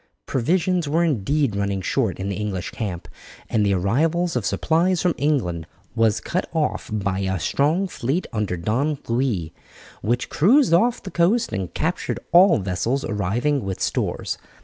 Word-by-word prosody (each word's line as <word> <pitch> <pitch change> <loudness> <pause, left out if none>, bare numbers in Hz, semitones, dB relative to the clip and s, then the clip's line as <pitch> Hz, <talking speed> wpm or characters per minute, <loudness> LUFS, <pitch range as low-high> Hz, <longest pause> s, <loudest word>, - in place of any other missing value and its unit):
Provisions 170 +5 0
were 165 +3 +2
indeed 140 - +1
running 100 -1 -1
short 110 0 -1
in 95 - -3
the 100 - -2
English 100 -3 -3
camp, 95 -6 -5 0.4
and 110 - +2
the 100 -1 +2
arrival 145 - +1
of 125 -5 -1
supplies 165 - +1
from 180 -2 +2
England 95 - -1 0.3
was 115 -2 +2
cut 180 - -3
off 160 -2 -1
by 100 -3 -1
a 95 -1 -1
strong 155 - +1
fleet 155 +1 -2
under 105 -5 -1
Don 130 - 0
Louis, 115 -10 -1 0.5
which 120 +3 0
cruised 245 - +4
off 235 +8 +3
the 190 - -7
coast 210 +8 +2
and 95 -2 -3
captured 170 +3 -1
all 175 0 +7
vessels 105 +7 -1
arriving 115 +8 0
with 95 -1 -4
stores. - - -2
125 Hz, 155 wpm, -22 LUFS, 100-165 Hz, 0.5 s, all